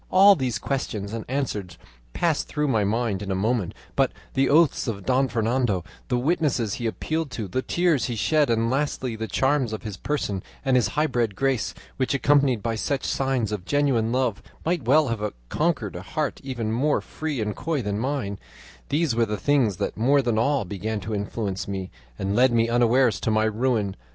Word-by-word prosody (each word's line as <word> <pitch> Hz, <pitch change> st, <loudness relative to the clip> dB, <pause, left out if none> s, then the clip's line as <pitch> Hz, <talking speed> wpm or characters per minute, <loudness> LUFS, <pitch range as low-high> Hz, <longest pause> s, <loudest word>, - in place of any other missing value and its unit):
"All 195 Hz, +2 st, +7 dB
these 125 Hz, -, -1 dB
questions 105 Hz, -4 st, -3 dB
and 115 Hz, -1 st, -4 dB
answers 105 Hz, -, -3 dB, 0.3 s
passed 165 Hz, -, 0 dB
through 150 Hz, -1 st, -1 dB
my 110 Hz, -6 st, +2 dB
mind 105 Hz, -1 st, 0 dB
in 100 Hz, -, -5 dB
a 95 Hz, -, 0 dB
moment; 105 Hz, -1 st, 0 dB, 0.2 s
but -, -, +3 dB, 0.2 s
the 135 Hz, 0 st, +2 dB
oaths 155 Hz, -2 st, +4 dB
of 100 Hz, -4 st, -4 dB
Don 130 Hz, +1 st, +3 dB
Fernando, 115 Hz, -5 st, 0 dB, 0.2 s
the 125 Hz, -, +1 dB
witnesses 130 Hz, -, +1 dB
he 120 Hz, -, -2 dB
appealed 155 Hz, +6 st, -2 dB
to, 110 Hz, -5 st, -5 dB
the 130 Hz, +8 st, -1 dB
tears 170 Hz, -2 st, +1 dB
he 120 Hz, -, -2 dB
shed, 145 Hz, +7 st, +2 dB
and 115 Hz, 0 st, +1 dB
lastly 135 Hz, -3 st, -1 dB
the 110 Hz, 0 st, -4 dB
charms 130 Hz, +4 st, +1 dB
of 110 Hz, -, -5 dB
his 105 Hz, -4 st, -6 dB
person 105 Hz, -7 st, -2 dB, 0.2 s
and 135 Hz, -1 st, +3 dB
his 120 Hz, -5 st, +4 dB
high 150 Hz, -, +4 dB
bred 120 Hz, -8 st, 0 dB
grace, 135 Hz, +1 st, 0 dB, 0.2 s
which, 130 Hz, +1 st, 0 dB
accompanied 140 Hz, -5 st, +3 dB
by 115 Hz, -1 st, 0 dB
such 135 Hz, +5 st, -1 dB
signs 130 Hz, -6 st, 0 dB
of 105 Hz, -4 st, -3 dB
genuine 130 Hz, -2 st, +1 dB
love, 125 Hz, -5 st, 0 dB, 0.2 s
might 170 Hz, -6 st, 0 dB
well 145 Hz, +2 st, +4 dB
have 105 Hz, -3 st, -2 dB, 0.2 s
conquered 140 Hz, -, 0 dB
a 90 Hz, -, -5 dB
heart 145 Hz, +10 st, -3 dB
even 120 Hz, -5 st, -3 dB
more 140 Hz, +6 st, +2 dB
free 155 Hz, -4 st, -4 dB
and 105 Hz, -1 st, -2 dB
coy 150 Hz, -5 st, -2 dB
than 105 Hz, 0 st, -2 dB
mine 120 Hz, -6 st, -2 dB, 0.5 s
these 150 Hz, -1 st, +1 dB
were 115 Hz, -1 st, +2 dB
the 105 Hz, 0 st, -2 dB
things 120 Hz, -4 st, +2 dB
that 100 Hz, -, -2 dB
more 135 Hz, +5 st, +3 dB
than 115 Hz, -3 st, +1 dB
all 135 Hz, 0 st, +1 dB
began 105 Hz, +3 st, -3 dB
to 110 Hz, +3 st, -4 dB
influence 100 Hz, -1 st, -3 dB
me 95 Hz, -2 st, -4 dB, 0.3 s
and 95 Hz, +1 st, -1 dB
lead 125 Hz, +2 st, +5 dB
me 115 Hz, -1 st, +3 dB
unawares 120 Hz, -2 st, +3 dB
to -, -, -1 dB
my 110 Hz, 0 st, +3 dB
ruin. 110 Hz, -2 st, 0 dB
120 Hz, 195 wpm, -25 LUFS, 105-140 Hz, 0.5 s, All